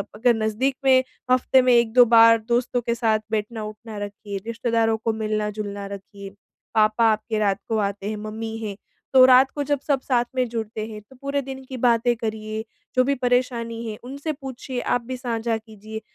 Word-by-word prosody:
अगर 240 +3 +3
नज़दीक 220 +5 0
में 260 -1 +6 0.3
हफ़्ते 255 +1 +4
में 250 -1 +4
1-2 235 +1 +5
बार 230 0 +7
दोस्तों 245 +1 +1
के 235 0 -1
साथ 225 -2 +2
बैठना-उठना 215 0 -4
रखिए, 205 0 -6
रिश्तेदारों 230 -1 +1
को 225 0 -1
मिलना-जुलना 210 -2 -3
रखिए। 200 0 -9 0.5
पापा 215 +1 +4
आपके 215 0 -2
रात 200 -1 +1
को 225 - +1
आते 200 -1 -2
हैं, 215 - -3
मम्मी 220 +1 -5
हैं, 215 -3 -5 0.4
तो 260 -1 +9
रात 260 +1 +6
को 290 - -1
जब 285 0 0
सब 280 -2 +2
साथ 245 -3 +1
में 255 -1 +1
जुड़ते 220 -2 -4
हैं 215 -1 -8
तो 210 +6 -20
पूरे 280 0 -1
दिन 265 0 -8
की 260 0 -7
बातें 240 0 +3
करिए, 220 -1 -4 0.3
जो 255 - +5
भी 280 +2 +1
परेशानी 245 -2 -1
है, 210 - -6
उनसे 280 +5 -4
पूछिए, 265 -2 -6
आप 245 - 0
भी 255 +2 -6
साझा 230 -2 -2
कीजिए, 220 0 -9
230 Hz, 180 wpm, -23 LUFS, 215-250 Hz, 0.5 s, तो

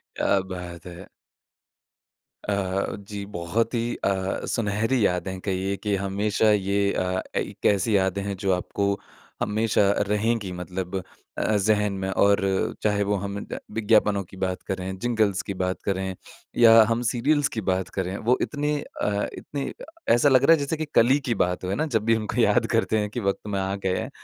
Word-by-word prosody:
क्या 100 - +2
बात 90 -2 -7
है। 85 -1 -10 1.4
अ, 100 -1 -1
जी, 100 0 -7
बहुत 100 +5 -2
ही 120 0 -1
अ, 95 -1 -1
सुनहरी 110 +2 +1
यादें 90 +1 0
हैं 95 - -6
कहिए 95 0 -1
कि 105 -1 -1
हमेशा 100 +3 +1
ये 100 0 +1
अ, 90 0 -1
एक - - -4
ऐसी 100 +2 +3
यादें 95 0 0
हैं, 100 0 -3
जो 95 0 0
आपको 100 +2 -1 0.4
हमेशा 105 -1 +2 0.2
रहेंगी 105 -1 0
मतलब 90 +1 -5 0.4
अ, 110 - +1
ज़हन 105 0 +2
में। 95 0 -3
और 100 +1 +4 0.4
चाहे 105 -1 +2
वो 100 +1 0
हम 100 +1 -4
अ, - - -6
विज्ञापनों 105 -2 +2
की 95 +1 -15
बात 95 -1 -2
करें, 95 0 -3
जिंगल्स 110 -4 +1
की 100 - -5
बात 90 0 -2
करें 95 -1 -1 0.4
या 115 -1 +8
हम 115 +1 +1
सीरियल्स 145 +4 +2
की 110 - -1
बात 95 0 -1
करें। 95 0 -1
वो 120 +4 +2
इतने 150 0 -1
अ, 105 -6 -2
इतने 140 -2 -5
अ, - - -11 0.3
ऐसा 120 +5 +4
लग 130 -1 +5
रहा 165 - +7
है 165 - +3
जैसे 145 +3 -2
कि 155 - -2
कल 115 - +6
ही 135 +3 +4
की 120 - +1
बात 90 +1 -3
हो 95 +2 -1
ना 155 - 0
जब 110 - -4
भी 115 0 +4
हमको 110 -1 -1
याद - - +3
करते 110 - +2
हैं 105 0 -1
कि 115 - -4
वक़्त 100 -1 -2
में 100 -2 -1
आ 95 +1 -1
गए 95 -2 -1
हैं। - - -4
100 Hz, 190 wpm, -25 LUFS, 95-110 Hz, 1.4 s, या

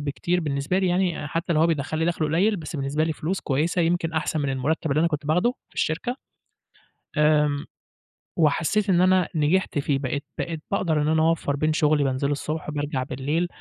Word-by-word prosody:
بكتير 160 +5 -1
بالنسبة 145 +3 -1
لي 190 - +1
يعني 175 -4 0
حتى 165 +3 -1
لو 155 - +2
هو 165 - +5
بيدخَّل 155 -1 -1
لي 160 - +1
دَخْل 170 -2 0
قليل 185 +8 +2
بس 160 -2 -6
بالنسبة 140 +2 0
لي 160 - -1
فلوس 175 +6 -3
كويسة 160 +6 0
يمكن 165 -1 0
أحسن 160 0 -1
من 140 - -1
المرتب 145 +4 -1
اللي 145 +3 +2
أنا 170 - +3
كنت 150 -2 -4
باخده 180 +10 +2 0.2
في - - -27
الشركة، 210 +11 -1 1.0
آمم، 150 -1 +3 0.7
وحسيت 170 +6 +2
إن 180 -2 +4
أنا 185 -1 +3
نجحت 155 +1 +1
فيه 140 -1 0
بقيت 140 +2 -3
بقيت 165 -2 -3
باقدَر 165 -6 +1
إن 150 - 0
أنا 160 0 +3
أوفّر 160 -3 +1
بين 155 +2 +1
شغلي 150 -2 +3
بانزله 135 +1 0
الصبح 155 +2 -4
وبارجَع 145 -3 -2
بالليل 145 +7 -1
155 Hz, 195 wpm, -24 LUFS, 145-170 Hz, 1.0 s, هو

